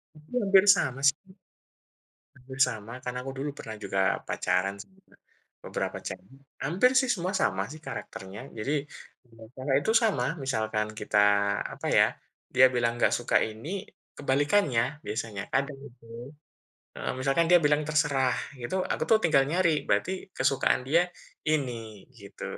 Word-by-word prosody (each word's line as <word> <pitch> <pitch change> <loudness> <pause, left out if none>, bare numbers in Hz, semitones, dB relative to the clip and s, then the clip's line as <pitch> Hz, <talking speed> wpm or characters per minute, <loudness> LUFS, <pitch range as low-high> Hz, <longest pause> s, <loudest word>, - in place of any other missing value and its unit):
Mungkin 155 +12 -4
hampir 195 -1 +6
sama, 130 -8 -2
sih. 140 - -3 1.2
Hampir 130 +1 -11
sama, 110 -1 -7
karena 125 0 -4
aku 135 +1 -6
dulu 145 +2 -2
pernah 110 -1 -7
juga 95 - -1 0.3
pacaran 100 +2 0
sama 190 - -23 0.7
beberapa - - -3
cewek. 130 +9 -9 0.3
Hampir 190 - +3
sih, 260 - -1
semua 180 0 -3
sama 95 0 +1
sih 155 - -11
karakternya. 95 +2 -7 0.2
Jadi, 140 +8 -1 0.5
dengan 115 -2 -15
cara 130 +1 -3
itu 220 - +1
sama, 195 - +1 0.2
misalkan 110 -4 -1
kita, 105 - 0 0.6
apa - - -7
ya, - - +7 0.5
dia 130 - +8
bilang 120 -1 +1
nggak - - +3
suka 120 - 0 0.2
ini, 145 - -6 0.4
kebalikannya 140 - +2 0.2
biasanya. 105 -2 -4
Kadang 140 0 0
itu, 120 -1 -22 0.9
heeh, - - -3
misalkan 135 +5 +2
dia 175 - +8
bilang, 145 0 +4
"Terserah", 145 -4 +2 0.3
itu 185 - -2 0.2
aku - - -3
tuh 220 - +7
tinggal 140 -5 +4
nyari, 170 -2 +3
berarti 185 - +1 0.2
kesukaan 135 -1 +2
dia 170 +4 +5 0.5
ini, 115 -8 -3
gitu. 100 0 -10
135 Hz, 145 wpm, -28 LUFS, 115-155 Hz, 1.2 s, dia